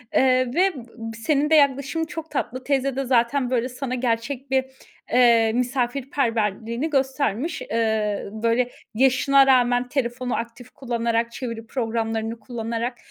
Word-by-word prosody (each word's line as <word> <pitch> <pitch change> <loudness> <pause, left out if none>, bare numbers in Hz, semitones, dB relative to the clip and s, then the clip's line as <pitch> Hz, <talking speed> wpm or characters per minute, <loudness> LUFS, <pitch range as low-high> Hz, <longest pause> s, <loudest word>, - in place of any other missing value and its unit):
Iıı, 255 -1 +3
ve, 375 +2 +3
ııı, 230 -2 -8
senin 300 -1 +2
de 320 - +5
yaklaşımın 280 +2 +2
çok 320 0 -8
tatlı. 255 -3 -3
Teyze 275 -1 0
de 270 0 -2
zaten, 250 +1 +2
böyle, 250 0 0
sana 255 0 -4
gerçek 250 +2 -2
bir, 265 -1 +2 0.5
ııı, 235 -3 +5
misafirperverliğini 245 -1 -1
göstermiş. 270 - -1
Iıı, 220 -3 -1
böyle, 235 +2 +2 0.2
yaşına 270 +3 +4
rağmen 245 -1 +3
telefonu 250 -1 -2
aktif 235 +1 -6
kullanarak, 235 -2 -1
çeviri 230 -2 -6
programlarını 225 -1 -2
kullanarak. 235 +1 -4
250 Hz, 130 wpm, -23 LUFS, 230-270 Hz, 0.5 s, de